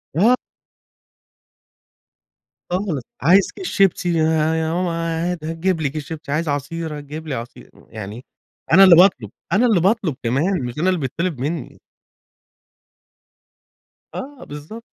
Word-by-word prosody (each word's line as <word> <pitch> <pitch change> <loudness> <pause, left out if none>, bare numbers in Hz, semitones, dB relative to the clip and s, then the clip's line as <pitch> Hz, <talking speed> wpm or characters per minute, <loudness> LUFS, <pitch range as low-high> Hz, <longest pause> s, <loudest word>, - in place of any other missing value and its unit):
آه. 230 +9 +4 2.3
خالص، 180 -7 -1 0.2
عايز 180 +7 +4
كيس 380 - -6
شيبسي 190 -2 +2
يا 160 - +3 0.3
يا 160 0 -1
ماما 180 0 0 0.3
عادي 170 -2 -3
هتجيب 165 +1 -1
لي 145 - 0
كيس 150 +2 -5
شيبسي، 155 -2 -7
عايز 155 +3 0
عصير 150 +2 -3
هتجيب 150 +3 -8
لي 140 - -2
عصير، 115 +1 -9 0.2
يعني 110 +4 -8 0.5
أنا 195 - +9
اللي 185 -3 +9
باطلب، 165 - +4 0.2
أنا 220 +6 +4
اللي 220 -7 +4
باطلب 190 - +1
كمان 140 +6 0
مش 120 +2 -6
أنا 180 +4 +2
اللي 185 -3 +1
بيتطلب 155 +3 -3
مني. 150 +6 -4 2.4
آه، 275 +1 -7
بالضبط. 150 +11 -9
165 Hz, 130 wpm, -20 LUFS, 145-185 Hz, 2.4 s, أنا